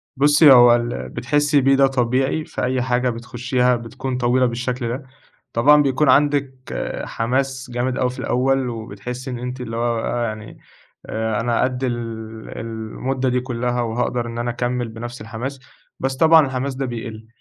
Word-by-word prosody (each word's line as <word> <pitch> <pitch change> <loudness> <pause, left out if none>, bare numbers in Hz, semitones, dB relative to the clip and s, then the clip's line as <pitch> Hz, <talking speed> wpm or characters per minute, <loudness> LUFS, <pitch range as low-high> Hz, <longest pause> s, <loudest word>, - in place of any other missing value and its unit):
بُصي، 145 +2 +6
هو 120 -2 +8
اللي 120 0 -3
بتحسّي 145 +2 +1
بيه 135 +1 +4
ده 135 0 +5
طبيعي 130 +4 0
في - - -5
أي 125 0 0
حاجة 125 0 +1
بتخُشّيها، 125 +1 0
بتكون 125 +2 -5
طويلة 125 +1 +2
بالشكل 125 +1 -2
ده، 130 +3 -5 0.5
طبعًا 145 +6 +6
بيكون 140 +1 +2
عندك 140 -1 +3 0.5
حماس 130 +2 -2
جامد 125 +1 -1
أوي 125 -1 +1
في 125 - -8
الأول، 130 0 +1
وبتحسّي 115 +3 -6
إن 120 - -5
أنتِ 125 +1 -5
اللي 115 -2 -5
هو 120 0 0
بقى 120 +1 -1
يعني، 110 -2 -6 0.5
آآ 110 -1 -2
أنا 120 0 +1
قَد 130 0 -1
ال 120 -2 0 0.6
المُدّة 115 +4 -3
دي 125 0 +1
كُلَّها 125 -1 -2
وهاقدر 120 +1 -1
إن 115 - -6
أنا 120 0 -1
أكمِّل 120 0 -2
بنفس 120 +2 -8
الحماس، 120 +5 -6 0.4
بس 135 0 -1
طبعًا 160 +1 +6
الحماس 130 +1 -3
ده 135 +1 -2
بيقِل. 115 -2 -6
125 Hz, 165 wpm, -21 LUFS, 120-130 Hz, 0.6 s, هو